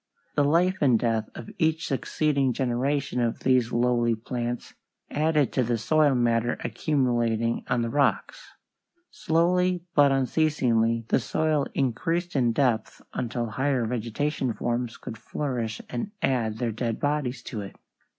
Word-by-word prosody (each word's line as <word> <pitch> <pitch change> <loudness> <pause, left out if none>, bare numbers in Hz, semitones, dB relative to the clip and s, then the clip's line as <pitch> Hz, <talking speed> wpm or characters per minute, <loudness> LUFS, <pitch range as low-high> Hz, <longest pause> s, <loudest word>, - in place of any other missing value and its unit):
The 145 - +2
life 175 +6 +3
and 130 -5 +5
death 115 -2 -1
of 115 - -8
each 160 0 +1
succeeding 140 -1 0
generation 130 +1 -1
of 115 -1 -1
these 125 -3 +2
lowly 120 -1 +2
plants 120 +1 -4 0.4
added 150 -2 +1
to 130 - +2
the 120 0 0
soil 145 +4 +3
matter 120 -1 +1
accumulating 120 -6 0
on 125 -1 +1
the 115 - -2
rocks. 145 - 0 0.6
Slowly 180 +2 +1
but 145 -2 +5
unceasingly 125 -5 +1
the - - +3
soil 155 +3 0
increased 165 +7 -1
in 120 -4 +3
depth 115 -3 0
until 120 -1 -2
higher 130 0 0
vegetable 125 +3 -2
forms 120 +2 -2
could 115 - -8
flourish 120 -7 -3
and 125 - -4
add 115 -5 0
their 120 0 -1
dead 115 0 -3
bodies 140 -4 -1
to 110 -5 -5
it. 100 - -9
125 Hz, 140 wpm, -26 LUFS, 115-145 Hz, 0.6 s, and